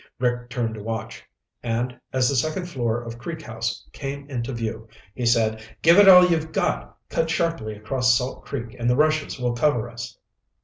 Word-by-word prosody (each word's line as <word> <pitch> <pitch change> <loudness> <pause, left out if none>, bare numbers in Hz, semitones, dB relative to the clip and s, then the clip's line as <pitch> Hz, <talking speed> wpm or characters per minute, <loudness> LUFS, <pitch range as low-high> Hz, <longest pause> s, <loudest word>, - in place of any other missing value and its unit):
Rick 120 -1 -1
turned 120 -2 -2
to 110 - -7
watch, 110 0 -5 0.4
and 120 +1 -2 0.2
as 130 -1 +2
the 140 - +1
second 155 +8 0
floor 120 -8 -2
of 115 0 -8
Creek 160 +5 -6
House 115 -2 -4
came 140 0 -6
into 120 0 -3
view, 115 -2 -4 0.3
he 120 +1 -2
said, 110 -2 +2 0.2
"Give 170 +4 +7
it 200 -1 +9
all 180 -1 +10
you've 160 -2 0
got. - - -1
Cut 165 0 -1
sharply 160 -10 -1
across 125 +3 +2
Salt 125 +1 -4
Creek 120 -3 -6
and 120 +1 +1
the 125 - +3
rushes 155 -1 +1
will 125 -1 0
cover 120 -2 +1
us." 120 0 -8
125 Hz, 185 wpm, -24 LUFS, 115-150 Hz, 0.4 s, all